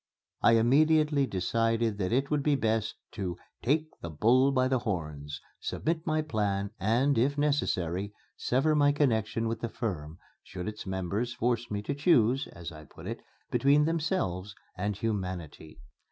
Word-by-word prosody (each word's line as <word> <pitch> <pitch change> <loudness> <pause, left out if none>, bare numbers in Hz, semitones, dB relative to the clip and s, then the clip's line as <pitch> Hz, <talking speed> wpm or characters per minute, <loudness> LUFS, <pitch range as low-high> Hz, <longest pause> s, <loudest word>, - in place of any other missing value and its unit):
I 115 - +6
immediately 145 +4 +4
decided 115 +2 0
that 95 0 -1
it 135 +4 +1
would 150 -1 +2
be 145 0 +2
best 110 -3 0 0.2
to 90 -5 -4 0.2
"take 155 +5 +1
the 85 - -5
bull 120 - +4
by 130 -1 +2
the 130 -1 +1
horns," 75 - -4 0.2
submit 160 0 -2
my 155 0 +1
plans, 100 -7 -1
and, 120 +7 +2
if 140 +4 +2
necessary, 100 - 0 0.2
sever 135 +5 +1
my 145 -1 +4
connection 115 -5 +1
with 115 0 -2
the 115 - -2
firm, 85 -10 -4 0.2
should 90 0 -7
its 105 -2 -6
members 95 +6 -2
force 120 0 0
me 105 0 -3
to 145 - -2
choose 135 -4 +3
(as 85 0 -8
I 75 -1 -11
put - - -13
it) - - -4 0.3
between 145 +2 +4
themselves 150 - -1 0.2
and 100 +2 -2
Humanity. 90 -8 -4
115 Hz, 155 wpm, -29 LUFS, 95-140 Hz, 0.3 s, I